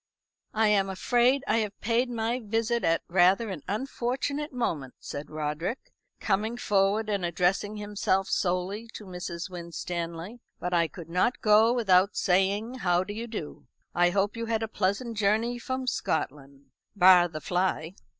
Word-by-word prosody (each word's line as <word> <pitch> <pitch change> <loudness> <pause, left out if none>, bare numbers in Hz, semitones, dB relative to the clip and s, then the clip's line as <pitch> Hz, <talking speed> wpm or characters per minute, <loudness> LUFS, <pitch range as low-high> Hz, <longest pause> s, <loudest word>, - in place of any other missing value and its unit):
"I 220 0 +3
am 195 -2 +3
afraid 245 +7 +2
I - - +2
have 210 -3 -2
paid 240 +3 +1
my 235 +1 -1
visit 225 +2 0
at 165 0 +2
rather 190 +5 +3
at 175 -6 -6
unfortunate 265 - -2
moment," 160 - -3
said 145 +1 -7
Roderick, 155 - -4 0.3
coming 215 +3 0
forward 205 -1 +1
and 200 -3 -1
addressing 180 +5 0
himself 205 -2 0
solely 185 +5 -1
to 210 - -8
Mrs. 180 -1 -6
Winstanley; 170 +3 -5 0.2
"but 180 0 -3
I 170 -1 +3
could 170 -1 -10
not 185 +8 +1
go 215 +2 +5
without 200 -5 +3
saying 200 +6 +1
How 180 -3 +2
do 205 - -6
you 230 +3 -5
do? 210 -10 -7 0.3
I 175 +1 +4
hope 195 +3 0
you 230 0 -4
had 225 -1 0
a - - -1
pleasant 215 +3 -1
journey 220 +4 +1
from 260 +2 -3
Scotland 140 - -3 0.2
bar 180 -2 +7
the 160 -2 -7
fly." 180 -1 -1
200 Hz, 155 wpm, -28 LUFS, 175-230 Hz, 0.3 s, bar